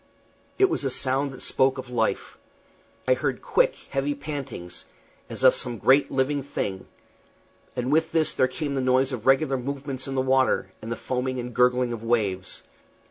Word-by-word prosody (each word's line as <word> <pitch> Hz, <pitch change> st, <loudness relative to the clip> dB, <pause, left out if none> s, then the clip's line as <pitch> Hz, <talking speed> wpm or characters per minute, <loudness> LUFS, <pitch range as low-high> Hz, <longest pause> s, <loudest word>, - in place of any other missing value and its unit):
It 390 Hz, -, +5 dB
was 355 Hz, -, -1 dB
a 135 Hz, -, 0 dB
sound 135 Hz, +2 st, +1 dB
that 130 Hz, -, -6 dB
spoke 130 Hz, 0 st, +2 dB
of 130 Hz, -1 st, -7 dB
life. 125 Hz, -, -1 dB, 0.7 s
I -, -, +6 dB
heard -, -, -2 dB
quick, -, -, +2 dB, 0.2 s
heavy 140 Hz, +1 st, -1 dB
pantings, 135 Hz, -, -7 dB, 0.4 s
as -, -, -3 dB
of -, -, +8 dB
some 120 Hz, -2 st, -3 dB
great 135 Hz, +5 st, +4 dB
living 140 Hz, +2 st, 0 dB
thing; 100 Hz, -8 st, -4 dB, 0.9 s
and 125 Hz, +2 st, -2 dB
with 160 Hz, +1 st, +2 dB
this 160 Hz, -2 st, +1 dB
there 130 Hz, -, +3 dB
came 140 Hz, +2 st, -4 dB
the 135 Hz, -, 0 dB
noise 130 Hz, +1 st, +2 dB
of 125 Hz, -2 st, -5 dB
regular 135 Hz, 0 st, +4 dB
movements 135 Hz, 0 st, -5 dB
in 135 Hz, -, -4 dB
the 130 Hz, -, +2 dB
water, 130 Hz, 0 st, +2 dB
and 115 Hz, -, -7 dB
the -, -, -1 dB
foaming 130 Hz, +1 st, -3 dB
and 125 Hz, 0 st, -5 dB
gurgling 125 Hz, 0 st, +2 dB
of 115 Hz, -1 st, -7 dB
waves. 105 Hz, -6 st, -1 dB
130 Hz, 180 wpm, -25 LUFS, 125-140 Hz, 0.9 s, of